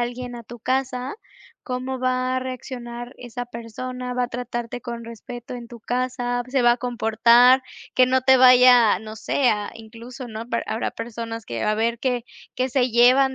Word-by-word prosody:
alguien 245 Hz, 0 st, -4 dB
a 235 Hz, -, -10 dB
tu 240 Hz, +2 st, -11 dB
casa, 255 Hz, -, -2 dB, 0.5 s
¿cómo 255 Hz, 0 st, -3 dB
va 255 Hz, 0 st, 0 dB
a -, -, +2 dB
reaccionar 245 Hz, -1 st, -7 dB
esa 245 Hz, 0 st, -6 dB
persona? 250 Hz, +2 st, -6 dB
¿Va 250 Hz, -, 0 dB
a -, -, -5 dB
tratarte 240 Hz, 0 st, -5 dB
con 235 Hz, -1 st, -6 dB
respeto 240 Hz, +2 st, -9 dB
en 240 Hz, -1 st, -8 dB
tu 235 Hz, 0 st, -12 dB
casa? 245 Hz, 0 st, -2 dB
¿Se 255 Hz, 0 st, 0 dB
va 240 Hz, -, +6 dB
a -, -, -8 dB
comportar? 240 Hz, +1 st, +4 dB, 0.3 s
Que 255 Hz, -1 st, +6 dB
no 260 Hz, 0 st, +2 dB
te 260 Hz, +1 st, +5 dB
vaya, 250 Hz, -5 st, +7 dB
no 215 Hz, 0 st, -9 dB
sé, 250 Hz, +4 st, +1 dB
a 210 Hz, -1 st, -2 dB
incluso 235 Hz, +3 st, -10 dB
¿no?, 220 Hz, +1 st, -7 dB
per 235 Hz, -, -1 dB
habrá 220 Hz, -, -2 dB
personas 230 Hz, -1 st, -6 dB
que, 115 Hz, -, -4 dB
a 215 Hz, -, +2 dB
ver 230 Hz, +2 st, 0 dB
que 245 Hz, -1 st, -1 dB, 0.3 s
que 255 Hz, +1 st, 0 dB
se 255 Hz, -1 st, +1 dB
llevan 255 Hz, +3 st, +5 dB
245 Hz, 185 wpm, -23 LUFS, 235-255 Hz, 0.5 s, vaya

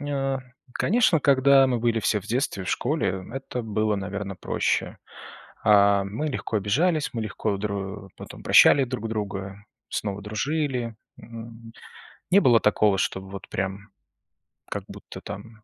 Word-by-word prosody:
М, 145 Hz, -, -6 dB
ня 135 Hz, -1 st, -1 dB, 0.3 s
конечно, 200 Hz, -, +3 dB
когда 135 Hz, -1 st, +5 dB
мы 125 Hz, -2 st, 0 dB
были 115 Hz, -1 st, +1 dB
все 105 Hz, 0 st, +1 dB
в -, -, -16 dB
детстве, 115 Hz, -5 st, -1 dB
в -, -, -6 dB
школе, 95 Hz, -, -1 dB
это 135 Hz, -2 st, -5 dB
было, 110 Hz, -1 st, 0 dB
наверно, 100 Hz, 0 st, -4 dB
проще. -, -, -1 dB, 0.7 s
А, 100 Hz, -2 st, +5 dB
мы 110 Hz, +11 st, -3 dB
легко 120 Hz, -4 st, -3 dB
обижались, 150 Hz, -, +1 dB
мы 115 Hz, -, -3 dB
легко 110 Hz, -1 st, -2 dB
дру 100 Hz, -1 st, -5 dB
потом -, -, -10 dB
прощали 140 Hz, -2 st, +6 dB
друг 120 Hz, -3 st, -4 dB
друга, 100 Hz, -2 st, -5 dB, 0.2 s
снова 105 Hz, -1 st, -3 dB
дружили. 125 Hz, +1 st, -2 dB, 0.2 s
М, 115 Hz, 0 st, -11 dB, 0.6 s
не 195 Hz, +3 st, +6 dB
было 120 Hz, -, +5 dB
такого, 105 Hz, -2 st, +3 dB
чтобы 95 Hz, +1 st, -2 dB
вот 100 Hz, -1 st, -9 dB
прям 95 Hz, +2 st, -4 dB, 0.8 s
как -, -, -4 dB
будто -, -, -10 dB
там 105 Hz, +2 st, -9 dB
110 Hz, 145 wpm, -25 LUFS, 100-130 Hz, 0.8 s, прощали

